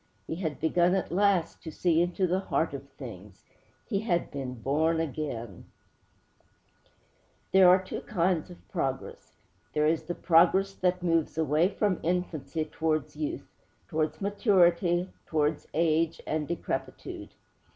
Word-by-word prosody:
He 160 - -4
had 160 -5 -3
begun 175 +3 +3
at 190 - -2
last 185 -2 +2
to 160 - -7
see 165 +1 +2
into 175 +2 +1
the 180 +1 +1
heart 195 - -1
of - - -7
things.' - - -11 0.4
He 200 -5 0
had 185 -5 -1
been 130 -3 -5
born 155 +7 +1
again! 135 - -4 1.9
There 190 -1 +7
are 185 +1 +7
two 185 - -6
kinds 180 -4 0
of 175 - -14
progress. 135 -7 -4 0.4
There 150 0 +2
is 160 +1 +2
the 175 - -4
progress 185 +3 +4
that 180 -1 0
moves 165 -3 +1
away 160 +2 +3
from 205 -3 0
infancy 165 -2 -2
towards 155 -1 -2
youth, 315 +2 -4 0.4
towards 155 +1 -2
maturity, 180 -3 +3 0.2
towards 150 -1 0
age 165 0 +2
and 155 -1 -2
decrepitude. 170 -1 -5
170 Hz, 135 wpm, -28 LUFS, 155-185 Hz, 1.9 s, There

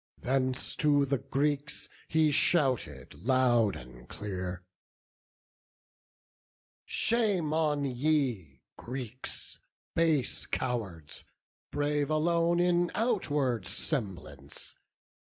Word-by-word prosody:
Thence 130 0 0
to 145 -2 +4
the 140 -1 0
Greeks 145 +2 -1 0.2
he 160 -1 +3
shouted, 130 - +2
loud 120 -4 +3
and 60 0 -12
clear: 90 -3 -5 2.2
"Shame 205 -10 +1
on 150 -3 +1
ye, 125 - 0
Greeks, 125 0 -6 0.3
base 160 -5 +1
cowards, 105 - -3 0.5
brave 145 0 0
alone 170 +2 +2
In 175 0 +3
outward 145 - +1
semblance! 95 - -4
135 Hz, 80 wpm, -30 LUFS, 110-155 Hz, 2.2 s, to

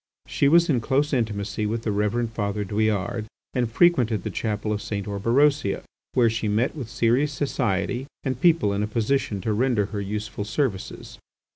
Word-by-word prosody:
She 140 - +1
was 170 +3 +5
in 130 -7 +2
close 145 +6 +1
intimacy 105 -3 -1
with 115 +2 -2
the 110 - -1
Reverend 105 +3 0
Father 105 -1 -2
Douillard 105 +1 -1 0.3
and 125 -3 0
frequented 120 - +3
the - - -3
chapel 105 -1 -2
of 105 - -3
St. 100 -2 -4
Orberosia, 115 +4 +2 0.3
where 120 -2 +5
she 115 -1 -1
met 110 +8 +1
with 130 -7 -6
serious 125 +7 +2
society 125 -3 -1 0.2
and 130 -2 -3
people 165 - +4
in 100 - -1
a 105 - 0
position 110 -2 0
to 110 +3 -1
render 115 -2 +2
her 100 - -2
useful 105 +1 -4
services. 110 -2 -3
110 Hz, 170 wpm, -24 LUFS, 105-130 Hz, 0.3 s, was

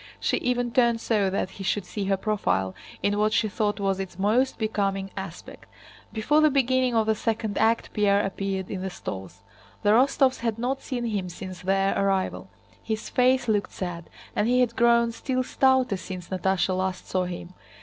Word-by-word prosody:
She - - +1
even 245 -1 0
turned 235 -2 +3
so 210 -4 +1
that 190 0 -2
he 195 - -8
should 195 +1 -1
see 200 +2 -4
her 195 0 +1
profile 190 - 0 0.3
in 205 0 +1
what 215 0 +2
she 225 - +2
thought 210 0 -1
was 195 -1 0
its 190 -2 -6
most 225 +7 +2
becoming 195 -3 -1
aspect. 190 -3 -8 0.4
Before 285 +8 +2
the 310 - +6
beginning 260 -2 +2
of 220 -1 +3
the 220 - +3
second 220 -1 -2
act 225 +1 +1
Pierre 205 -1 +3
appeared 195 -1 -3
in 190 - -4
the 190 - -3
stalls. 95 - -7 0.4
The 205 - +4
Rostóvs 260 +2 +4
had 230 -2 -1
not 255 +4 -2
seen 245 -3 -3
him 200 -5 -2
since 185 0 -8
their 195 +1 +1
arrival. 195 -1 0 0.3
His 220 -1 -4
face 255 0 +3
looked 210 -2 0
sad, 175 -3 -5 0.3
and 210 - +1
he 250 +1 +3
had 235 -2 +1
grown 235 0 +4
still 255 +2 -2
stouter 260 -4 +2
since 185 -2 -8
Natásha 190 0 0
last 185 0 -2
saw 185 -1 0
him. 175 0 -7
210 Hz, 185 wpm, -26 LUFS, 190-235 Hz, 0.4 s, the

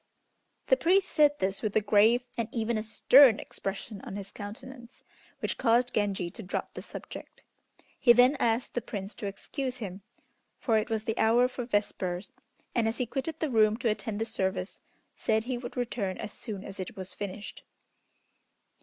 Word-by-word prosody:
The - - +4
priest 385 +1 +3
said 295 -2 +4
this 190 -3 -1
with 215 -3 -2
a - - +6
grave 215 +3 +4
and 230 -1 -2
even 230 0 -1
a 215 - 0
stern 240 +3 +6
expression 195 +1 -6
on - - -7
his 200 -1 -7
countenance, 235 +4 -10 0.4
which - - -2
caused 245 +2 +3
Genji 195 -4 0
to 225 - -9
drop 195 - -4
the - - -6
subject. - - -10 0.6
He 245 - +7
then 250 +4 +6
asked 230 0 +1
the 245 - -1
Prince 200 -2 -6
to 205 - -5
excuse 255 +6 -4
him, 200 -4 -6 0.6
for 225 -3 +2
it 215 - -4
was 220 -1 -1
the 220 0 -2
hour 235 +3 +5
for 250 -1 -5
vespers, 200 -3 -2 0.4
and 230 -2 +2
as 225 - -1
he 250 - 0
quitted 275 +6 -4
the 310 -4 -1
room 215 -1 +4
to 245 -2 0
attend 215 0 -2
the 225 - 0
service, 190 -3 -3 0.3
said 220 0 +1
he 245 0 -3
would 240 +1 -8
return 225 -6 -2
as 205 - -6
soon 200 -3 -7
as 195 -1 -9
it 185 - -5
was 185 -1 -7
finished. 205 0 -6
220 Hz, 180 wpm, -29 LUFS, 205-245 Hz, 0.6 s, He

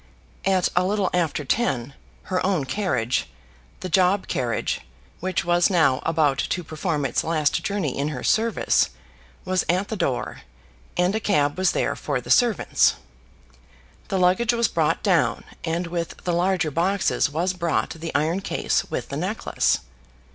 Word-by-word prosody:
At 190 -2 +3
a 180 - +4
little 195 0 0
after 160 -4 0
ten, 135 - 0 0.3
her 185 -1 -1
own 185 -7 +1
carriage, 130 - -1 0.5
the - - -3
job 185 +2 +2
carriage, 120 -4 -1 0.4
which 185 -1 -1
was 175 0 +3
now 160 -8 +3
about 150 -4 +2
to 180 - -1
perform 155 -2 -2
its - - 0
last 155 -3 +1
journey 195 -10 -1
in 140 +1 -1
her 145 -5 -5
service, 225 0 +2 0.6
was 185 0 +1
at 185 +3 +1
the 220 - -2
door, 135 - -2 0.6
and 180 +2 +2
a 220 - 0
cab 145 -10 +1
was 185 0 +2
there - - 0
for 140 -4 -2
the 125 - -6
servants. 240 -5 +3 1.1
The 195 - -1
luggage 185 +6 +3
was 235 -1 +2
brought 160 -2 0
down, 165 - +2 0.2
and 170 +2 -1
with 170 -1 -4
the 175 - 0
larger 175 -2 +1
boxes 180 +2 +1
was 170 +5 -1
brought 170 -3 -1
the 165 0 -6
iron 160 +5 +1
case - - -1
with - - -4
the - - -4
necklace. - - 0
175 Hz, 155 wpm, -24 LUFS, 150-190 Hz, 1.1 s, a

